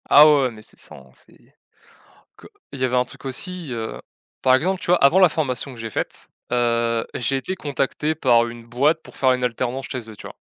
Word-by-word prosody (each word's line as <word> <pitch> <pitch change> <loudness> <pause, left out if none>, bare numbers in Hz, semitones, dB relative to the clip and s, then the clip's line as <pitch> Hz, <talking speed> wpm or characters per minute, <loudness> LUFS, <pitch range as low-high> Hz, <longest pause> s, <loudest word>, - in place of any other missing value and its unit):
Ah 150 +2 +9
ouais, 150 -2 +5
ouais, 130 - 0
mais, 110 -2 -13
c'est - - -12
ça - - -9
en 65 -1 -16
c'est - - -21 1.0
que - - -14 0.2
il 140 - -8
y - - -1
avait 125 0 -1
un 125 0 +3
truc 125 - -12
aussi, 170 +3 -4
heu, 110 -1 -5 0.4
par 130 0 +5
exemple, 185 +7 0
tu - - -7
vois 180 +1 +5
avant 160 +7 +6
la 185 -2 +7
formation 140 -3 -2
que 120 - -12
j'ai 115 0 -5
faite, 105 - -5 0.2
heu, 115 -1 +1
j'ai 125 +3 -1
été 185 +8 -4
contacté 150 0 -2
par 120 -6 +3
une 115 0 -10
boîte 140 +7 +1
pour - - -15
faire 130 -1 +3
une 125 0 -3
alternance 125 +2 -2
chez 120 -3 -6
eux, 110 - -10
tu - - -10
vois? - - -12
130 Hz, 235 wpm, -22 LUFS, 120-150 Hz, 1.0 s, Ah